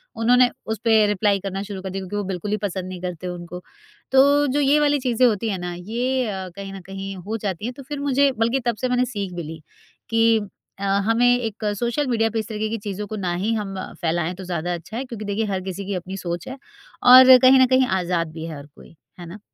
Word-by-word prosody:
उन्होंने 245 +2 +4 0.2
उस 220 -2 -3
पे 220 -2 +5
रिप्लाई 205 -1 +1
करना 195 0 -4
शुरू 200 -2 -7
कर 190 - -5
दिया 195 +1 -4
क्योंकि 190 +2 -6
वो 205 - -1
बिल्कुल 190 +1 -4
ही 210 - +1
पसंद 185 -1 -5
नहीं 185 -1 -7
करते 180 -1 -5
उनको। 180 0 -7 0.5
तो 285 +2 +5
जो 290 - +1
ये 290 +1 +4
वाली 290 -1 +2
चीज़ें 250 -1 +2
होती 220 0 0
हैं 195 - -2
ना 175 0 -4
ये 240 +8 -2 0.3
कहीं 195 -1 -7
ना 195 - -7
कहीं 195 0 -6
हो 205 +5 -5
जाती 200 -2 -4
है। 245 - -2
तो 275 +2 -11
फिर 290 +2 -6
मुझे 280 0 +2
बल्कि 230 +4 +1
तब 240 -2 +1
से 255 - 0
मैंने 250 0 +2
सीख 200 -6 -5
भी 175 -1 -5
ली, 160 +1 -8 0.5
कि 225 0 +4 0.4
अ, - - -4 0.2
हमें 230 +2 +3
एक 225 -2 -5 0.2
सोशल 240 +4 -1
मीडिया 225 -2 +1
पे 225 - 0
इस 215 - -4
तरीके 215 -1 -3
की 225 - -2
चीज़ों 205 0 -4
को 215 - -5
ना 185 -4 -2
ही 205 +6 -1
हम 205 -3 -3 0.3
फैलाएँ 170 0 0
तो 190 - -9
ज़्यादा 175 -1 -3
अच्छा 175 +6 -7
है। 255 - -2
क्योंकि 230 -4 -7
देखिए 205 +2 -1
हर 195 -2 -2
किसी 190 +1 -6
की 200 0 -3
अपनी 185 +2 -5
सोच 175 -2 -5
है। 260 - -7 0.5
और 255 +1 +10
कहीं 260 +1 +6
ना 260 - +7
कहीं 260 -1 +3
आज़ाद 170 -2 -1
भी 160 0 -6
है 160 -2 -6
हर 140 - -10
कोई, 150 +3 -18 0.2
है 175 - -8
ना? 175 +5 -10
210 Hz, 245 wpm, -22 LUFS, 185-245 Hz, 0.5 s, और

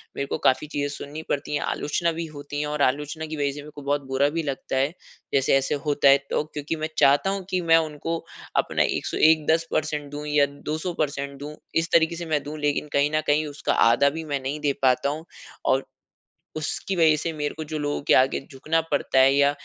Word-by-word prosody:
मेरे 140 - -2
को - - -2
काफ़ी 135 +3 +2
चीजें 145 -1 -2
सुननी 150 +2 -7
पड़ती 145 +1 -2
हैं, - - -1
आलोचना 170 +3 -1
भी 165 +1 -4
होती 145 0 -6
है। 150 - -2
और 150 -1 -3
आलोचना 150 +4 0
की 155 0 -6
वजह 140 -1 0
से 145 - -8
मेरे 150 +1 -11
को 145 - -8
बहुत 145 +1 0
बुरा 135 +2 +2
भी 165 +1 -2
लगता 140 -2 -4
है। 140 +5 +1 0.4
जैसे 135 -1 +3
ऐसे 135 +2 0
होता 145 -1 +3
है 140 - +8
तो - - 0
क्योंकि 150 +2 -3
मैं 155 0 -3
चाहता 145 +7 +4
हूँ 195 -1 -2
कि 185 - 0
मैं 165 - +9
उनको 160 +2 -4 0.4
अपना - - +2
101, 155 -1 +2
10% 165 0 +1
परसेंट 150 -2 -2
दूँ 145 +1 -6
या 150 -1 +4
200% 155 +5 -4
परसेंट 140 -2 -2
दूँ 150 +2 -7 0.2
इस 165 +1 +1
तरीके 165 0 +4
से 170 - -5
मैं 155 -3 0
दूँ 150 +1 -6
लेकिन 145 0 0
कहीं 140 +1 +3
न 155 - +2
कहीं 150 +1 +3
उसका 145 0 -2 0.2
आधा 140 +5 +4
भी - - -4
मैं 145 -2 -2
नहीं 140 +3 -3
दे 145 -2 +1
पाता 130 +1 +3
हूँ। 155 +3 -5 0.4
और 135 +1 +2 0.7
उसकी 155 +5 -3
वजह 160 -2 +5
से 160 +2 -2
मेरे 150 -1 -3
को 160 - -4
जो 155 +1 -5
लोगों 145 0 -2
के - - +3
आगे 130 +1 +3
झुकना 155 +5 0
पड़ता 140 -2 +2
है, 135 +1 +6
या 140 0 +4
150 Hz, 230 wpm, -24 LUFS, 140-155 Hz, 0.7 s, मैं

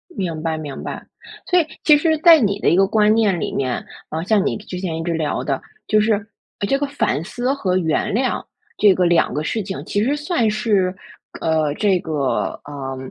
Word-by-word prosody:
明 170 -6 -3
白， 160 -1 -2
明 145 -3 -7
白。 - - -6 0.4
所 360 - +4
以 320 - 0 0.2
其 300 -2 +6
实 315 +1 +2
在 330 0 +8
你 200 -5 0
的 - - +2
一 - - +3
个 195 +1 +4
观 215 0 +3
念 210 -5 +2
里 - - -3
面， 130 -3 -2 0.2
啊， 160 +1 -3
像 200 +1 +2
你 - - 0
之 200 -3 -7
前 175 -4 -3
一 - - -3
直 170 0 -1
聊 155 -2 -1
的， - - -2 0.3
就 215 - +3
是 215 -1 0 0.4
这 275 - +2
个 285 - 0
反 160 - -1
思 245 +8 -2
和 190 -10 0
原 160 -1 0
谅 255 +4 0 0.3
这 205 -2 +6
个 180 - +2
两 175 -1 +3
个 150 - -2
事 220 +7 -2
情， 190 -1 -6
其 205 - 0
实 275 +5 +1
算 295 - 0
是 210 -4 +1 0.5
呃， 155 -2 +1
这 195 -2 +2
个， 150 -6 -2
呃， 135 -2 -6
195 Hz, 225 characters per minute, -20 LUFS, 160-225 Hz, 0.5 s, 在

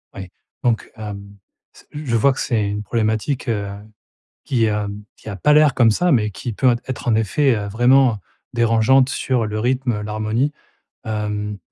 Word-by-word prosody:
Oui, 95 -1 -8 0.3
donc, 120 -2 0
hem, 100 -2 -8 0.4
s - - -19
je 145 -5 -3
vois 135 +5 +4
que - - -8
c'est 110 -5 0
une 105 +1 -3
problématique, 110 +5 -1
heu, 105 -3 -1 0.8
qui, 120 -4 +1
hem, 105 -1 -3
qui - - -13
a 100 - -5
pas 150 +11 +3
l'air 150 -2 +5
comme 115 -3 +4
ça, 175 +10 +2
mais 105 -4 +2
qui 120 +4 -6
peut 125 +2 +2
être 130 -1 -5
en 115 - +3
effet, 120 +5 +2
heu, 105 -1 -4
vraiment 120 +2 +4 0.3
dérangeante 120 +2 +3
sur 125 -4 -1
le 105 0 -3
rythme, 125 +2 0
heu, 105 -1 -3
l'harmonie. 110 +6 -1 0.5
Hem, 105 -1 -3
115 Hz, 175 wpm, -20 LUFS, 105-130 Hz, 0.8 s, l'air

